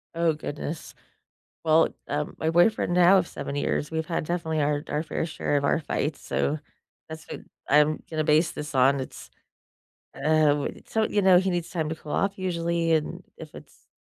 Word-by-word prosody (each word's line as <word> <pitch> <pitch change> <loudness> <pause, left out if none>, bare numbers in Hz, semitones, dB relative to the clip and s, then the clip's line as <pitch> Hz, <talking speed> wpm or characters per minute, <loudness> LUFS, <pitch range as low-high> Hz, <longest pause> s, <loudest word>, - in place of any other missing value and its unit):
Oh 165 -1 +2
goodness. 150 +1 -6 0.7
Well, 160 0 +5 0.2
um, 145 +1 -2
my 160 - 0
boyfriend 175 +2 +3
now 180 +2 +6
of 180 - +2
7 140 - -6
years, 145 0 -1
we've 160 0 -2
had 165 -2 -2
definitely 160 -2 -1
our 145 +1 0
our 150 - -1
fair 160 - -3
share 160 -3 -1
of 140 - 0
our 150 - +2
fights, 150 0 -2
so 150 - -1 0.5
that's 160 0 -8
what - - -8 0.3
I'm 150 +2 +4
gonna 155 -1 -1
base 155 +2 +3
this 150 -1 -7
on, 135 +2 +4
it's, 130 - -9 0.9
uh, 155 -1 +3
what 145 - -3
it - - -18
so, 220 -1 +1
you 205 - +1
know, 185 -2 +7
he 190 +1 +1
needs 175 -2 -2
time 160 -3 -2
to - - -2
cool 155 -2 -12
off 200 0 0
usually, 170 -2 0
and 155 -1 -1
if - - -11
it's - - -15
160 Hz, 195 wpm, -26 LUFS, 150-170 Hz, 0.9 s, know